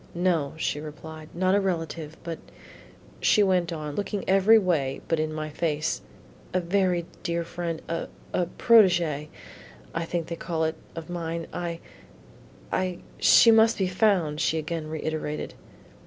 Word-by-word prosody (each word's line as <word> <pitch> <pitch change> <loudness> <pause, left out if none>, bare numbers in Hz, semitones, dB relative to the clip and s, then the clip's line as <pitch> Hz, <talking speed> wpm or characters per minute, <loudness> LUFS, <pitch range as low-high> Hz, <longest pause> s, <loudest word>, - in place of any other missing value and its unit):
"No," 170 -5 +1
she 150 - -1
replied, 155 +1 -9
"not 185 +2 +2
a 200 - +4
relative, 165 -4 -3
but," 165 -2 -5 0.8
she 210 - +4
went 180 -3 +2
on, 155 -3 -4
looking 200 +3 -3
every 195 +4 +6
way 155 -10 +1
but 165 - +1
in 155 0 -1
my 155 0 -4
face, 155 0 -1 0.5
"a - - +4
very 180 -1 +1 0.2
dear 170 -2 -1
friend 170 -1 -4
a 165 0 -3 0.3
a 175 - +1
protegee, 175 - +4 0.7
I 165 0 -2
think 170 0 -2
they 170 - -5
call 165 -1 -2
it, 160 0 +1 0.2
of 165 -1 -6
mine; 170 -1 -4
I 170 -1 -4 0.9
I 185 -1 -1 0.2
She 230 - +7
must 225 0 +5
be 190 - +1
found," 180 -5 +2
she 160 - +1
again 160 0 -3
reiterated. 155 -1 -3
170 Hz, 150 wpm, -26 LUFS, 155-185 Hz, 0.9 s, She